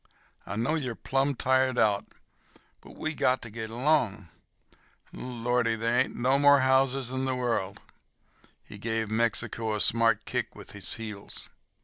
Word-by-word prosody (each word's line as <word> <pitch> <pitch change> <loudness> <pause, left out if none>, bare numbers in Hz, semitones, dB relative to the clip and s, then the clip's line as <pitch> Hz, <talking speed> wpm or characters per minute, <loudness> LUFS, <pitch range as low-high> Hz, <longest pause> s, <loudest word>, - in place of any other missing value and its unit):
I 95 - -4
know 115 +8 0
you're 130 -7 -2
plumb 135 +3 0
tired 130 0 +2
out, 105 -3 +2 0.7
but - - -14
we 155 - -3
got 130 -3 +1
ter 120 - -7
git 110 0 -6
along. 115 - 0 0.9
Oh, - - -9
Lordy, 120 -1 0
ain't 110 - -4
there 120 +3 +2
no 130 +3 +1
mo' 145 0 +7
houses 130 -1 +2
in 130 0 -2
the 130 -1 0
world!" 115 -6 -2 0.8
He 105 - -12
gave 110 0 -2
Mexico 115 0 0
a - - -2
smart 115 +1 +3
kick - - -3
with - - -10
his 100 +2 -2
heels. 105 -3 -7
120 Hz, 155 wpm, -28 LUFS, 110-130 Hz, 0.9 s, mo